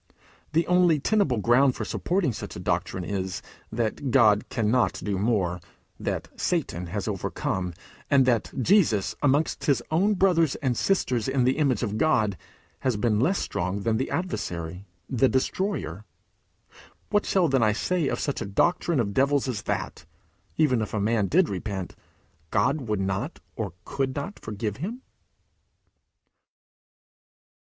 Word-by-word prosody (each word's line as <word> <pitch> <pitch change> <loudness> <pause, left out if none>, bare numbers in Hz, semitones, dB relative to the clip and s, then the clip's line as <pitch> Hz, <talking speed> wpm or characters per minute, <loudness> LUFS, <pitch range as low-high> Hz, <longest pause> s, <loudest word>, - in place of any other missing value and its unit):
The 165 +2 +3
only 180 -3 +4
tenable 150 - +2
ground 125 +5 +4
for - - -4
supporting 175 -8 0
such 105 - -7
a - - -6
doctrine 90 - -1
is, 95 -1 -3 0.3
that 115 +4 -2
God 110 -5 +4
cannot 115 +1 +2
do 100 -2 -3
more; 95 -5 0 0.4
that - - -3
Satan 85 +2 -1
has 100 +4 -4
overcome; 95 -3 -2 0.3
and 135 -2 +5
that 120 -4 +1
Jesus, 140 - +3
amongst 145 +2 +1
his 135 -5 +2
own 195 +6 +3
brothers 175 -6 +3
and 130 -5 -1
sisters 125 - +1
in 135 -1 +1
the 130 +4 +2
image 135 -5 +2
of 110 -1 -2
God, 110 -11 +2 0.4
has 130 -5 0
been 105 0 +1
less 175 - +2
strong 90 +3 -2
than 110 +2 +1
the 130 - -2
adversary, 90 - -4 0.2
the 130 0 +2
destroyer. 130 - -1 1.1
What 205 0 +4
then - - -4 0.2
shall 135 -3 +3
I 110 - +4
say 165 +8 0
of - - -1
such 140 - -2
a - - -2
doctrine 165 - +1
of 100 -4 0
devils 140 +2 +2
as 115 -5 -2
that, - - -3 0.5
even 130 -7 +3
if 110 - -3
a - - 0
man 105 0 +1
did 175 - +3
repent, 95 -1 -4 0.5
God 130 - +1
would 105 -2 0
not 95 - -2 0.2
or 105 -8 -4
could 135 -1 -2
not 145 +9 -5
forgive 105 -1 -4
him? 225 - -5
125 Hz, 150 wpm, -26 LUFS, 105-150 Hz, 1.1 s, and